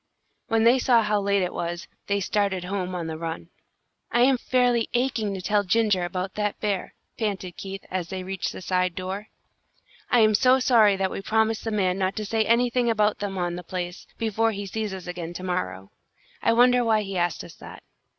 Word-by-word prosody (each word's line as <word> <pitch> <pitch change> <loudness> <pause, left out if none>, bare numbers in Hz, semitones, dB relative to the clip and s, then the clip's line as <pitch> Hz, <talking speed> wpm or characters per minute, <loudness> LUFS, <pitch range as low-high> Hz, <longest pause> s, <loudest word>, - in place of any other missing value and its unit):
When 225 0 +2
they 240 +3 +5
saw 240 -3 +4
how 210 -1 +1
late 200 -1 +2
it 180 - -2
was, 170 0 -4 0.2
they 200 0 +1
started 195 -2 0
home 185 -1 -3
on 170 -2 -3
the 160 -1 -5
run. 165 0 -5 0.6
"I 240 - +3
am 260 0 +4
fairly 245 -2 +2
aching 240 -4 0
to 185 - -6
tell 205 +1 +2
Ginger 205 -2 +2
about 185 +2 -4
that 210 -1 -2
bear," 200 -3 -2 0.2
panted 195 -5 -3
Keith, 195 0 -7
as 180 -2 -3
they 190 -1 -4
reached 190 0 -3
the - - -9
side 180 -1 0
door. 190 +3 -5 0.8
"I 245 - +5
am 215 0 +5
so 255 +4 +5
sorry 230 -6 +5
that 190 -1 -1
we - - -4
promised 220 +2 +1
the - - 0
man 195 -3 0
not 190 0 0
to 215 - -3
say 220 +2 +1
anything 240 +1 +2
about 210 -2 +2
them 205 -1 -3
being 185 -2 -2
on 175 0 -2
the 180 - -7
place, 175 +1 -5
before 225 0 +1
he 200 0 -5
sees 215 +1 -3
us 190 -2 -7
again 175 -1 -5
to 180 - -7
morrow. 95 - -3 0.5
I - - +3
wonder 245 +1 +5
why 220 -2 +2
he 195 -1 -6
asked 175 -2 0
us - - -11
that." - - -11
200 Hz, 210 wpm, -25 LUFS, 185-225 Hz, 0.8 s, they